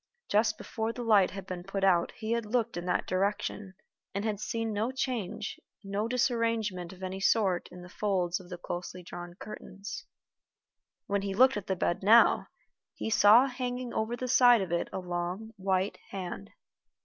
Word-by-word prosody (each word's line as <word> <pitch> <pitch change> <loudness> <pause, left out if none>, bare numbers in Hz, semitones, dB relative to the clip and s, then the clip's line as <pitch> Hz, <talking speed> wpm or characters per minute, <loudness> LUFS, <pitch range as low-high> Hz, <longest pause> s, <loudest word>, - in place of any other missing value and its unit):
Just 215 +1 +3
before 225 0 -3
the 240 +1 -6
light 210 -5 +5
had 195 -1 -7
been 185 -2 -6
put 195 +1 -4
out 175 -3 +4
he 220 0 -4
had 235 0 +1
looked 230 -3 0
in 175 0 -4
that 180 - +1
direction, 200 0 -2 0.4
and 200 +2 -1
had 210 -3 -1
seen 225 0 -2
no 220 +4 0
change, 225 -6 -3 0.2
no 200 +2 -2
disarrangement 230 -7 0
of 190 0 -12
any 185 +1 -4
sort 195 -3 +2
in 180 0 -10
the - - -10
folds 180 -2 0
of 180 -2 -14
the 180 - -6
closely 180 +1 -6
drawn 175 0 -8
curtains. 200 0 -8 1.0
When 200 0 0
he 195 -1 -3
looked 260 +4 +6
at 205 -2 -5
the 190 - 0
bed 175 -1 0
now, 220 +4 +6 0.5
he 225 - -4
saw 220 +4 +7
hanging 250 -1 -4
over 225 +2 -1
the 255 - -3
side 245 -2 +6
of 180 - -6
it 170 - 0
a - - -4
long 180 +4 -4
white 190 +1 0
hand. 175 - -6
200 Hz, 180 wpm, -30 LUFS, 185-225 Hz, 1.0 s, saw